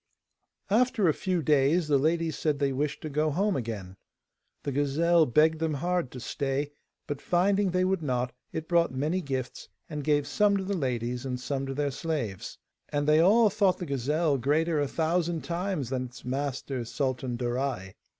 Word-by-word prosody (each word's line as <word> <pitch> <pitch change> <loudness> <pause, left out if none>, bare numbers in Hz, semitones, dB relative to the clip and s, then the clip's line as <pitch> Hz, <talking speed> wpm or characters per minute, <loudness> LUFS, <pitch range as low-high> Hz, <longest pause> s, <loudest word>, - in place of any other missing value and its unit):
After 230 -2 +3
a 155 - +4
few 180 -1 -1
days, 150 +3 +3
the 145 -2 +3
ladies 165 +2 +1
said 150 -2 0
they 140 -1 +1
wished 145 +2 -2
to - - -5
go 150 +2 +1
home 195 +7 +1
again. 105 -7 -5 0.7
The 140 - -2
gazelle 155 +4 +3
begged 155 +5 +3
them 160 -2 0
hard 175 -1 -1
to 125 - -9
stay, 140 +2 -2 0.3
but 145 -1 -5
finding 195 +3 +2
they 185 +1 +1
would 190 -2 0
not, 125 -4 -1 0.2
it 160 0 -5
brought 170 -3 +3
many 150 +8 -1
gifts, 135 -5 -4 0.2
and 150 -2 -5
gave 145 -1 +2
some 200 +7 +2
to 195 - -2
the 200 +1 -2
ladies 125 -5 -2
and 125 -2 -3
some 135 +1 -3
to 135 - -4
their 145 0 0
slaves. 130 - -4 0.3
And 145 0 -1
they 155 +1 +5
all 210 +5 +5
thought 200 -3 +2
the 180 - -5
gazelle 145 +2 0
greater 155 +5 +1
a 145 - +1
thousand 165 +2 0
times 170 -7 -2
than 130 -1 -1
its 125 0 -12
master, 135 -1 -3
Sultan 130 0 -2
Darai. 120 -5 -2
150 Hz, 180 wpm, -28 LUFS, 130-170 Hz, 0.7 s, they